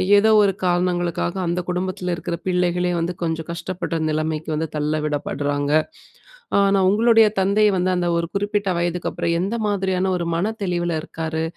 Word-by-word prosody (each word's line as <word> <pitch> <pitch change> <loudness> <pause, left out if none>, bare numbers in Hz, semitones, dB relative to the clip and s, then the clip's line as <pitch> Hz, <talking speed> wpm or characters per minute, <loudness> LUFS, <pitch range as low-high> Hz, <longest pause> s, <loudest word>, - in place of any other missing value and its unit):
ஏதோ 205 +2 +5
ஒரு 195 -1 +2
காரணங்களுக்காக 175 -1 0
அந்த 175 +1 0
குடும்பத்துல 180 0 -2
இருக்குற 170 +1 -4
பிள்ளைகளே 180 0 +1
வந்து, 170 +2 -1
கொஞ்சம் 160 0 -2
கஷ்டப்படுற 170 0 -4
நிலைமைக்கு 155 0 -2
வந்து 160 +1 -1
தள்ள 150 0 0
விடப்படுறாங்க. 145 -1 -2 0.9
அ, - - +5 0.2
நான் 190 -1 +3
உங்களுடைய 225 +2 +5
தந்தை 200 +3 +3
வந்து, 185 +1 +1
அந்த 175 -1 0
ஒரு 170 0 -1
குறிப்பிட்ட 205 0 0
வயதுக்கு 175 0 -1
அப்புறம் 170 0 -1
எந்த 195 +6 -1
மாதிரியான 190 -2 0
ஒரு 170 -1 -3
மனத்தெளிவுல 175 -4 -1
இருக்காரு? 160 -2 -4
180 Hz, 150 wpm, -21 LUFS, 165-190 Hz, 0.9 s, ஏதோ